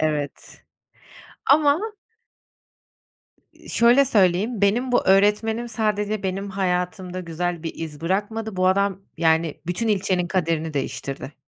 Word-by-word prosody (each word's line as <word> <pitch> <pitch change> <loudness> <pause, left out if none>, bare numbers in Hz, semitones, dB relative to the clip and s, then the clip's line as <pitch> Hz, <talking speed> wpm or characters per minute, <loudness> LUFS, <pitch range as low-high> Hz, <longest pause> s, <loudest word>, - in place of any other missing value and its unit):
evet. 150 -2 -3 0.9
Ama 290 +1 +5 1.7
Iıı, - - -16
şöyle 240 +4 +5
söyleyeyim: 205 -1 +2
Benim 240 +6 +2
bu 245 - +2
öğretmenim 210 +4 +3
sadece 210 -2 -1
benim 195 +1 -3
hayatımda 180 -1 -2
güzel 175 0 -3
bir 165 - -3
iz 160 -2 -7
bırakmadı. 205 +4 -2
Bu 185 0 +2
adam, 195 0 +1 0.2
yani, 160 -1 +1
bütün 185 +6 -1
ilçenin 190 -3 +1
kaderini 165 -3 -1
değiştirdi. 135 0 -4
190 Hz, 115 wpm, -23 LUFS, 170-215 Hz, 1.7 s, Ama